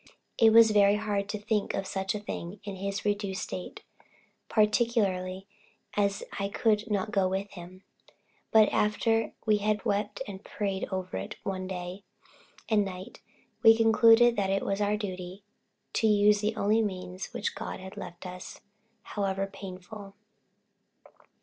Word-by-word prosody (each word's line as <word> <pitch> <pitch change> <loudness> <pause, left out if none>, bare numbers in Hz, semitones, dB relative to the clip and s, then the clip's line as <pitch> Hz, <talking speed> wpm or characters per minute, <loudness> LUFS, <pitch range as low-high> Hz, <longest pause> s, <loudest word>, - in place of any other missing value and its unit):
It 225 -1 +7
was 225 0 +7
very 205 -1 +5
hard 205 -2 -2
to 210 - -2
think 210 0 -1
of 195 - -2
such 190 +2 -2
a - - -2
thing 195 -2 -6
in 200 -2 -6
his 200 +1 -4
reduced 205 -2 -1
state, 180 - -7 0.7
particularly 210 -4 +1 0.5
as 200 -1 +1 0.2
I 200 0 -1
could 215 +1 +1
not 210 0 -1
go 195 -3 +2
with 195 +2 -3
him; 185 +1 -11 0.7
but 220 -1 +6
after 225 +1 +1
we 215 -1 +4
had 210 0 -1
wept 205 0 -1
and 195 -1 -8
prayed 195 -2 -3
over 185 - -3
it 95 - -5
one 185 -1 -3
day 180 +1 -6 0.6
and 215 -2 +3
night, 185 -1 -8 0.4
we 225 0 +7
concluded 230 +1 +6
that 195 -2 +1
it 195 0 0
was 195 +1 -1
our 205 +1 +1
duty 185 -1 -6 0.5
to 225 - +2
use 210 0 +4
the 215 +1 0
only 215 +2 +2
means 185 -2 -4
which - - -3
God - - -6
had 190 0 -9
left 175 +1 -9
us, 180 +1 -8 0.4
however 195 -1 -2
painful. 195 +1 -10
200 Hz, 150 wpm, -29 LUFS, 190-210 Hz, 0.7 s, It